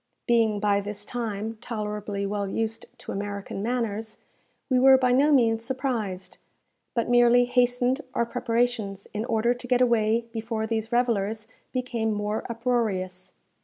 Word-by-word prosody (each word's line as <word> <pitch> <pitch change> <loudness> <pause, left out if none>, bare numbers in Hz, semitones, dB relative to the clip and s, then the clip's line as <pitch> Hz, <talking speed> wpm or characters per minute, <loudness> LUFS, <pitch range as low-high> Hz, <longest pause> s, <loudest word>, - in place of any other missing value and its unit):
Being 225 -3 +3
by 200 -1 +2
this 205 0 -6
time 225 -2 -4
tolerably 210 -3 -3
well 200 0 -2
used 225 +2 -3
to - - -8
American 200 -1 -4
manners, 220 -2 -2 0.5
we 255 -1 +3
were 265 +1 +8
by 255 -1 +2
no 280 +4 +4
means 225 -5 +3
surprised, 230 -8 -3 0.6
but 235 - 0
merely 245 0 +5
hastened 245 +2 +2
our 235 - +2
preparations, 230 -4 -1
in 215 +2 -2
order 235 0 +2
to 245 0 -10
get 250 0 +3
away 230 -2 +2
before 225 -1 -2
these 225 0 -2
revellers 220 -3 0 0.2
became 240 -4 -1
more 210 +1 -2
uproarious. 220 -6 -1
225 Hz, 140 wpm, -26 LUFS, 210-245 Hz, 0.6 s, were